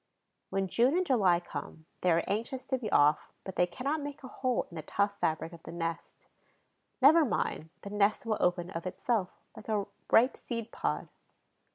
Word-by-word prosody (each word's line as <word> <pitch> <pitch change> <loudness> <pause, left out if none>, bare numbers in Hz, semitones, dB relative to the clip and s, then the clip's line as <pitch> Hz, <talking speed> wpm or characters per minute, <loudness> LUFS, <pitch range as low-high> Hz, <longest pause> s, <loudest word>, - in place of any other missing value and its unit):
When 195 0 0
June 245 - +3
and 370 - +2
July 195 - +4
come, 160 -2 -8 0.2
they 180 - +2
are 165 +1 +3
anxious 235 +5 -2
to 260 0 0
be 220 -4 -4
off, 145 +1 +4
but 190 - -7
they 180 - +3
cannot 280 - -2
make 285 -1 -7
a - - -6
hole 255 -1 -1
in - - -18
the 160 - -4
tough 200 +6 0
fabric 160 +1 -1
of 170 - -11
the - - -9
nest. 165 -1 -5 0.8
Never 315 +4 +8
mind, 160 - -1
the 200 - -7
nest 210 +2 +2
will 220 -2 0
open 180 0 +1
of 170 0 -4
itself, 195 +1 0 0.3
like 215 - -11
a 210 -2 +1 0.3
ripe 250 +4 +6
seed 230 -2 -5
pod. - - -2
205 Hz, 190 wpm, -31 LUFS, 175-250 Hz, 0.8 s, Never